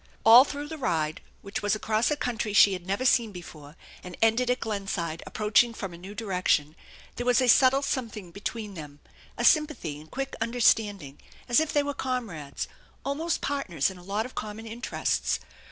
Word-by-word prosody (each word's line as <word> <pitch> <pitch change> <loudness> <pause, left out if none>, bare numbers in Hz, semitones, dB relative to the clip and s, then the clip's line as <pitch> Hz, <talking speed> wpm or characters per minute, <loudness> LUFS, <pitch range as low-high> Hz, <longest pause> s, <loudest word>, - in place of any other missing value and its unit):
All 230 +3 +10
through 290 0 -5
the 315 0 -7
ride, 160 - -1 0.2
which 200 +5 -4
was 205 +1 +1
across 215 +1 0
a 300 - +1
country 235 -6 -3
she 200 -1 +7
had 180 -1 -6
never 200 +7 -1
seen 235 -4 +3
before, 160 -5 -11 0.3
and 180 -1 -9
ended 225 +3 +2
at 250 - +1
Glenside 195 -6 -3
approaching 220 +2 +2
from 195 -5 -6
a - - -9
new 195 +4 -10
direction, 180 -8 0 0.4
there 245 - -3
was 250 +1 +4
a 255 - +2
subtle 265 +3 +5
something 225 -9 -4
between 210 +2 -5
them, 150 -4 -10 0.4
a - - 0
sympathy 300 - +2
and 155 - -16
quick 270 +1 -4
understanding 215 - +1 0.3
as 240 - +4
if 315 -1 0
they 290 - +2
were 285 0 -3
comrades, 225 - -4 0.4
almost 320 +4 -1
partners 195 - -1
in 185 - -12
a - - -14
lot 205 +4 -2
of 255 - -9
common 215 +1 -6
interests. 230 +2 -1
215 Hz, 185 wpm, -27 LUFS, 180-250 Hz, 0.4 s, All